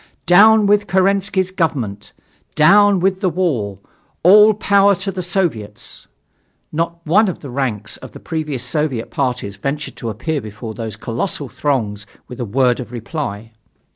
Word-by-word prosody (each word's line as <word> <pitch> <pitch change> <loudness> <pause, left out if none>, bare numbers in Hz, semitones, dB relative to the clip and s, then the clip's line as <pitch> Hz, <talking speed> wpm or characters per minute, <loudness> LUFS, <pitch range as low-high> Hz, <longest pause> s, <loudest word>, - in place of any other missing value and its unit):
"Down 210 +5 +6
with 205 0 +2
Kerensky's 190 0 +1
government! 135 - -2 0.4
Down 200 +5 +5
with 190 +1 0
the 190 - +2
war! 140 - -1 0.5
All 210 +4 +7
power 200 -1 +3
to 195 +2 -3
the 185 -1 -4
Soviets!" 165 - -3 0.6
Not 170 +1 -3
one 205 +8 +4
from 185 - -2
the 140 - -10
ranks 120 -6 -3
of - - -11
the - - -10
previous 155 -6 -4
Soviet 130 -3 -2
parties 125 -7 -2
ventured 140 +7 -4
to 115 - -5
appear 135 +8 -3
before 110 +1 -8
those 110 -1 -6
colossal 125 - -4
throngs 110 -8 -2 0.2
with 125 - -10
a 120 - -2
word 125 +3 +1
of 125 -2 -7
reply. 115 -3 -5
150 Hz, 150 wpm, -18 LUFS, 115-185 Hz, 0.6 s, All